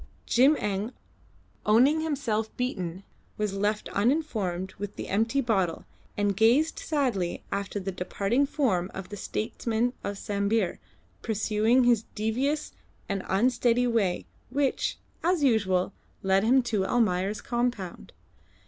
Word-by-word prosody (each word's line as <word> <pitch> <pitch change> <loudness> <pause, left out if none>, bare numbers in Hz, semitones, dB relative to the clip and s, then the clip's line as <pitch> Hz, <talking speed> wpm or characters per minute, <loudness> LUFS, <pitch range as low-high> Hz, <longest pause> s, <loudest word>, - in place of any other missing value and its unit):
Jim 270 +6 +5
Eng, 205 +4 -2 0.7
owning 255 +9 +4
himself 265 -9 -1
beaten, 190 -7 -3 0.3
was 210 -2 -1
left 205 +2 -1
uninformed 200 - 0
with 205 0 -5
the - - -6
empty 225 +7 +1
bottle, 195 -9 0 0.3
and 205 -1 +1
gazed 245 - +3
sadly 245 - -1
after 200 +1 -2
the 195 0 -3
departing 200 +8 0
form 200 - 0
of 190 -1 -6
the 205 - -6
statesman 225 +3 -1
of 200 0 -3
Sambir 200 -1 0 0.4
pursuing 220 +3 +2
his 240 -3 +4
devious 260 +8 -1 0.4
and 195 -1 -2
unsteady 245 +3 +2
way, 215 -7 +1 0.2
which, 275 +1 0 0.3
as 345 -2 +2
usual, 200 -7 +2 0.3
led 190 0 +3
him 255 +3 +4
to 215 -5 0
Almayer's 195 -2 +1
compound. 240 -7 -2
220 Hz, 120 wpm, -27 LUFS, 195-250 Hz, 0.7 s, Jim